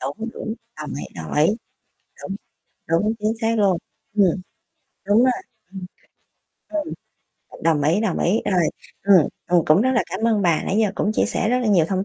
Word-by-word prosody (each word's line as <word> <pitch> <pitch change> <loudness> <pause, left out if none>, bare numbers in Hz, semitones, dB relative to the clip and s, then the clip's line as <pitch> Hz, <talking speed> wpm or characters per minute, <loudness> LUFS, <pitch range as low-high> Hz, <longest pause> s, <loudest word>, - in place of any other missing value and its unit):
Đúng, 145 - -4
đúng, 220 - -4 0.2
đồng 150 -1 -6
ý, 145 - -5
đồng 80 -1 -6
ý, 150 +2 +4 0.8
đúng, 195 - -4 0.5
đúng, 205 +7 +2
chính 215 +1 0
xác 225 0 +1
luôn. 190 -4 +3 0.4
Ừm, 205 -2 +5 0.8
đúng 205 +2 +4
rồi. 255 - +5 0.4
Ừm. 190 -2 -7 1.6
Ừ, - - -13
đồng 160 -3 +3
ý, 160 +8 +2
đồng 215 -5 0
ý. 200 +6 +2
Rồi, 180 -4 +2 0.3
ừm, 190 -6 +5 0.2
ừm, 175 -2 +3
cũng 155 +7 +4
rất 260 - +2
là 240 - +3
cảm 225 - -2
ơn 210 -3 +2
bà, 170 -3 +2
nãy 200 - 0
giờ 210 -3 +1
cũng 215 - 0
chia - - +3
sẻ - - -1
rất 250 - +2
là 245 - -1
nhiều 180 -6 +4
thông 190 0 -1
195 Hz, 190 wpm, -22 LUFS, 165-220 Hz, 1.6 s, Ừm